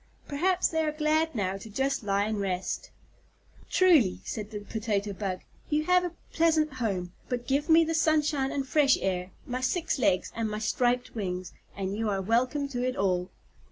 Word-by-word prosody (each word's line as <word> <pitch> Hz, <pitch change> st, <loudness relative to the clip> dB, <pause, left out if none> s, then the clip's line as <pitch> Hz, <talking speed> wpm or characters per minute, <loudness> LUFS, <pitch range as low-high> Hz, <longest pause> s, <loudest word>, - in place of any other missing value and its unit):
Perhaps 355 Hz, +6 st, +1 dB
they 320 Hz, -1 st, 0 dB
are 305 Hz, -, 0 dB
glad 310 Hz, 0 st, +1 dB
now 195 Hz, -3 st, -1 dB
to 210 Hz, +3 st, -10 dB
just 270 Hz, +5 st, 0 dB
lie 200 Hz, -1 st, +1 dB
and 215 Hz, 0 st, -2 dB
rest." 190 Hz, -, -2 dB, 0.8 s
"Truly," 315 Hz, -, +4 dB
said 210 Hz, -1 st, -5 dB
the 210 Hz, -2 st, -6 dB
Potato 205 Hz, -1 st, -2 dB
Bug, 190 Hz, -2 st, -3 dB, 0.3 s
"you 300 Hz, 0 st, +1 dB
have 360 Hz, +2 st, +4 dB
a 350 Hz, -1 st, -4 dB, 0.2 s
pleasant 315 Hz, -3 st, +3 dB
home, 195 Hz, -8 st, -2 dB, 0.2 s
but 245 Hz, -1 st, -2 dB
give 280 Hz, +5 st, 0 dB
me 325 Hz, +1 st, +7 dB
the 325 Hz, 0 st, -1 dB
sunshine 305 Hz, -4 st, +2 dB
and 275 Hz, -1 st, -2 dB
fresh 280 Hz, 0 st, +4 dB
air, 180 Hz, -1 st, -1 dB, 0.2 s
my 255 Hz, +1 st, -3 dB
six 315 Hz, +1 st, 0 dB
legs, 185 Hz, -7 st, +2 dB
and 225 Hz, -1 st, -1 dB
my 210 Hz, -, -3 dB
striped 245 Hz, +3 st, 0 dB
wings, 185 Hz, -4 st, -4 dB, 0.2 s
and 195 Hz, 0 st, -2 dB
you 220 Hz, 0 st, -1 dB
are 195 Hz, -1 st, 0 dB
welcome 250 Hz, +8 st, +1 dB
to 245 Hz, -2 st, -2 dB
it 255 Hz, 0 st, -1 dB
all." 185 Hz, -2 st, 0 dB
245 Hz, 185 wpm, -28 LUFS, 200-305 Hz, 0.8 s, me